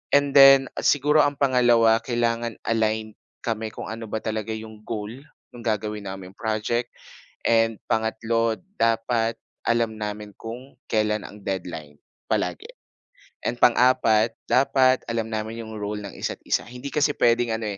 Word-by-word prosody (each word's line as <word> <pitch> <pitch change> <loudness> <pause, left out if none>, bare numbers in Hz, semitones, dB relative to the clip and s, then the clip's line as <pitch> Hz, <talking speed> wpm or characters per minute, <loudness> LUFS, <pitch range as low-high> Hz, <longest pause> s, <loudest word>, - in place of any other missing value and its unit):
And 145 0 +3
then, 135 -1 +7
siguro 150 +2 +3
ang 145 -1 +3
pangalawa, 120 -4 +4
kailangan 120 -1 -1
aligned 110 -1 -1 0.2
kami 110 -1 -3
kung - - -7
ano 115 0 -6
ba 110 0 -4
talaga 110 0 -3
'yong 110 -1 -9
goal 105 -2 -4 0.4
no'ng 120 -1 -12
gagawin 105 -1 -2
naming 95 -1 -7
project. 110 +2 -1 0.6
And 115 -1 +3
pangatlo, 115 0 0 0.2
dapat 115 0 +1 0.3
alam 115 -2 +1
namin 105 0 -5
kung 120 +4 -9
kailan 105 -1 +1
ang 105 -1 -14
deadline, 80 -6 -5 0.3
palagi. - - -2 0.8
And 120 0 -2
pang-apat, 115 -2 +4 0.2
dapat 130 -1 +3
alam 115 -1 -2
namin 110 +1 -4
'yong 110 -1 -8
role 105 0 -4
ng 100 - -9
isa't-isa. - - -2
Hindi 125 +4 -8
kasi 145 0 +1
puwedeng 120 -2 +2
ano 105 -2 -3
115 Hz, 140 wpm, -24 LUFS, 110-120 Hz, 0.8 s, then